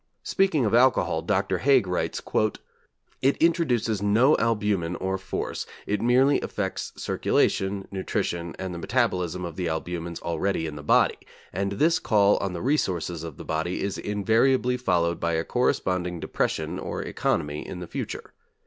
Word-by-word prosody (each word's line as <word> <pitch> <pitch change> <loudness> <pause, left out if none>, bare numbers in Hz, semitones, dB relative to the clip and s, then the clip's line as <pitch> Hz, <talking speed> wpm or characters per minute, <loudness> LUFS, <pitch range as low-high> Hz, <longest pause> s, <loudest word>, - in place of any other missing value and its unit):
Speaking 190 -9 +2
of 105 - 0
alcohol 125 +2 +3
Dr. - - 0
Haig 135 -5 +4
writes: 90 -1 -2 1.0
'It 135 +2 +3
introduces 125 - +1
no 110 +8 +4
albumen 105 -7 0
or 95 +1 -2
force, 95 0 -4 0.2
it 105 0 -1
merely 130 +4 +4
affects 95 -2 -3
circulation, 95 0 0
nutrition, 85 -3 -2
and 95 -1 -4
the 85 - -5
metabolism 90 -5 0
of 85 -2 -7
the 90 -2 -1
albumens 85 +1 -4
already 85 +1 -1
in 80 -2 -5
the 75 - -7
body, 75 - +3 0.3
and 100 +2 -1
this 160 - +3
call 105 -2 +3
on 95 -2 -2
the 85 - -5
resources 90 - 0
of 80 -4 -7
the - - -9
body 80 +3 -2
is 100 -1 -2
invariably 115 +5 +2
followed 85 -8 +1
by 85 0 0
a 80 0 +1
corresponding 90 -7 0
depression - - -2
or - - -4
economy 75 0 -1
in 90 - -6
the 90 - -5
future.... - - -6
95 Hz, 155 wpm, -26 LUFS, 85-120 Hz, 1.0 s, Haig